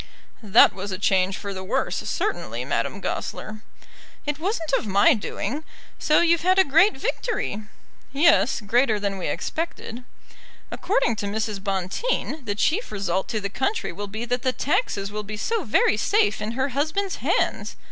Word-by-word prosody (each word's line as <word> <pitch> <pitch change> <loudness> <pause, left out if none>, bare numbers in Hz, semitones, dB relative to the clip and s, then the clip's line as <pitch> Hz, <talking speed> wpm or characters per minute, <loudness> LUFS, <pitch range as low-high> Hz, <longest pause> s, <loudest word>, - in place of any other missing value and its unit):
"That 215 0 +6
was 195 +2 -6
a 185 - -3
change 190 -1 +2
for 200 -1 -5
the 190 0 -6
worse, 190 - -1
certainly, - - -2
Madame - - -2
Goesler." 215 0 -4 0.6
"It 295 0 -2
wasn't 335 -4 -2
of 230 - +1
my 200 +11 +5
doing. 245 +5 -4 0.4
So 305 - +4
you've 340 -1 +3
had 370 +2 +3
a 380 - +7
great 330 +5 +4
victory." 265 - -2 0.5
"Yes; 280 -4 +4
greater 220 +1 +2
than 200 -1 -2
we 180 - -3
expected." 315 -7 -4 0.7
"According 385 - 0
to 205 - -3
Mrs. 210 -1 -3
Bonteen, 195 - -2
the 205 -2 -2
chief 345 - 0
result 190 -2 -1
to 225 -3 -2
the 200 - -3
country 335 - -1
will 205 0 -6
be 220 +4 -5
that 245 +1 -1
the 255 0 0
taxes 210 - -1
will 210 0 -3
be 210 +1 -7
so 445 - -1
very 215 -1 +3
safe 415 - +2
in 215 +2 -3
her 265 +3 0
husband's 310 +9 -1
hands! - - 0
230 Hz, 165 wpm, -24 LUFS, 200-320 Hz, 0.7 s, a